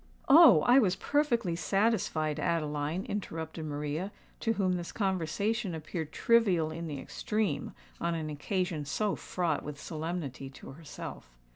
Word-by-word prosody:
"Oh! 280 - +9
I 245 - +6
was 190 -7 +3
perfectly 235 - +1
satisfied, 175 -4 +1
Adeline," 155 +3 -1
interrupted 160 -7 -4
Maria, 150 +5 -3 0.3
to 225 - +1
whom 190 -4 +1
this 175 -1 -3
conversation 195 +1 -1
appeared 160 0 -5
trivial 195 -9 +3
in 165 +1 -5
the 145 -3 -4
extreme 205 -7 -2 0.2
on 170 0 0
an 155 -2 -3
occasion 175 +1 -2
so 205 +8 0
fraught 170 -5 -1
with 145 -1 -7
solemnity 155 -5 -4
to 135 - -11
herself. 135 - -9
170 Hz, 135 wpm, -30 LUFS, 155-200 Hz, 0.3 s, Oh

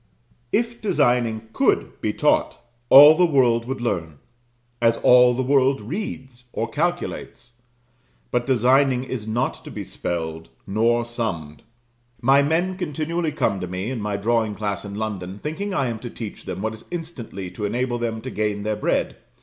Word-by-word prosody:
If 235 +1 -1
designing 120 - +1
could - - +1
be - - 0
taught, - - +1 0.3
all 145 +3 +10
the 180 - +2
world 120 -6 +3
would 130 0 -4
learn: 85 -10 -2 0.6
as 115 0 +3
all 125 0 +6
the 130 - -1
world 135 0 +3
reads 125 - -6
or 115 - -2
calculates. 150 -7 -3 0.8
But 120 +1 0
designing 130 +1 +3
is 125 -4 -5
not 115 +3 -2
to - - -9
be - - -6
spelled, 80 -1 -5 0.2
nor 115 +4 +1
summed. 95 -11 -4 0.6
My 135 +3 +5
men 170 +6 0
continually 165 0 -2
come 110 -9 0
to 90 - -4
me, 95 +6 -4
in 125 -4 -4
my 105 -1 -2
drawing 110 0 0
class 100 0 -3
in 100 -1 -7
London, 100 -3 -4
thinking 160 - -4
I 140 -8 0
am 115 -3 -3
to 120 - -7
teach 110 -3 -8
them 95 - -5
what 110 0 -1
is 110 - -12
instantly 130 - -6
to 105 +3 -4
enable 120 +3 -1
them 115 -1 -3
to 130 - -6
gain 105 -1 -2
their 105 0 -1
bread. 105 - -1
120 Hz, 165 wpm, -23 LUFS, 105-135 Hz, 0.8 s, all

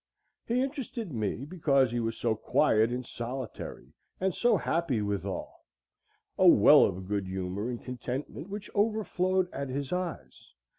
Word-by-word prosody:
He 245 +2 +2
interested 255 - -5
me 110 +3 -2
because 140 -6 +2
he 120 - -1
was 115 -1 -2
so 115 -2 +1
quiet 110 +1 +2
and 125 +1 -3
solitary 120 +1 -6 0.3
and 190 0 +1
so 235 +1 +3
happy 140 -2 0
withal; 100 -2 -4 0.8
a - - +6
well - - +8
of 95 +1 -4
good 100 -1 -1
humor 95 +4 -3
and 120 -2 -5
contentment 125 - -5
which 205 +1 -7
overflowed 195 -3 +1
at 140 0 -4
his 140 +3 -3
eyes. 180 -2 -5
130 Hz, 145 wpm, -29 LUFS, 115-185 Hz, 0.8 s, well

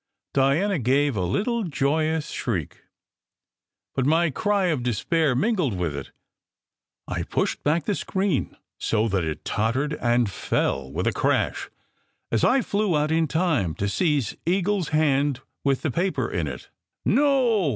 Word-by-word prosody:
Diana 150 +8 +2
gave 135 +2 +2
a 95 - -1
little 215 - 0
joyous 155 0 0
shriek, 90 - -4 1.1
but 135 - 0
my 160 +4 +3
cry 205 - +1
of 150 -6 0
despair 130 +5 +1
mingled 180 - +1
with 85 -5 -2
it. 70 - -6 1.0
I - - -2
pushed - - -2
back 155 +1 +1
the 205 - +1
screen 190 -6 -1 0.2
so 110 0 +1
that 95 -3 0
it 80 -1 -4
tot 110 +3 0
tered 145 +3 -1
and 120 -1 +2
fell 70 -8 -1
with 85 +6 -2
a - - +1
crash, - - 0 0.6
as 115 - +1
I 260 -1 +4
flew 200 -5 +1
out 150 +1 0
in 160 0 +2
time 145 - 0
to 100 - -2
seize 145 - 0
Eagle 195 +4 +1
s 170 - -3
hand 145 -3 +1 0.2
with 135 -2 +1
the 155 - 0
paper 170 - 0
in 85 -3 -2
it. 65 -3 -7 0.4
"No 250 - +3
145 Hz, 155 wpm, -24 LUFS, 115-180 Hz, 1.1 s, I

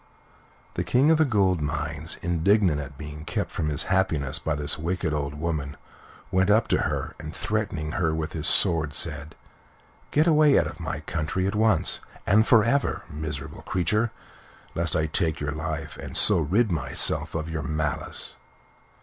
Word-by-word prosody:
The - - -2
King 135 +6 +3
of 160 - +3
the 160 - +5
Gold 95 - +2
Mines, 75 +1 -3
indignant 85 -1 +2
at 70 -1 -9
being 75 0 -8
kept - - -3
from 75 - -2
his 75 +1 0
happiness 85 -8 +1
by 80 - -1
this 75 0 0
wicked 85 0 -2
old 70 -1 -2
woman, 75 -3 -3 0.5
went 95 +1 +2
up 110 +2 +4
to - - +2
her, - - -2
and 80 +1 -7
threatening 100 -8 -2
her 80 -3 0
with 80 0 -3
his 80 -1 -2
sword, 80 -6 +2
said: 75 -1 -1 0.7
"Get 150 +2 +3
away 155 -3 +5
out - - +3
of - - -7
my - - -4
country 85 +4 -2
at 100 - -1
once, 110 +1 +3 0.3
and 110 +4 +4
for 115 -3 +6
ever, 140 +5 0
miserable 75 -1 -5
creature, 105 +6 0 0.6
lest 85 -1 0
I 80 - +2
take 80 0 0
your 75 0 -2
life, 80 0 -5
and - - -5
so - - +5
rid 110 +2 +1
myself 65 -2 +1
of 80 -1 -2
your 80 -2 -3
malice." 75 -1 -2
80 Hz, 170 wpm, -25 LUFS, 75-100 Hz, 0.7 s, for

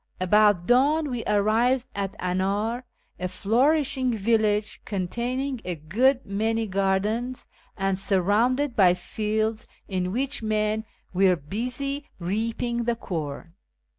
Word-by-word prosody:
About 205 -1 +4
dawn 285 - +3
we 240 -2 -3
arrived 230 +5 +2
at 195 0 -3
An; 180 +1 -1
ir, 215 +6 -1 0.4
a 180 - -1
flourishing 255 - +1
village 215 0 +1
containing 240 +7 -2
a 180 -1 -3
good 240 - +1
many 220 +3 0
gardens, 205 +5 -1 0.3
and 195 0 0
sur 195 0 +2
rounded 240 +8 +2
by 180 -3 +5
fields 215 +4 -2 0.2
in 185 -2 -2
which 270 +5 -1
men 215 0 0 0.3
were 185 0 +4
busy 250 - -4
rea})ing 230 +5 -2
the 235 - +2
corn. 165 -5 -5
215 Hz, 120 wpm, -25 LUFS, 195-245 Hz, 0.4 s, by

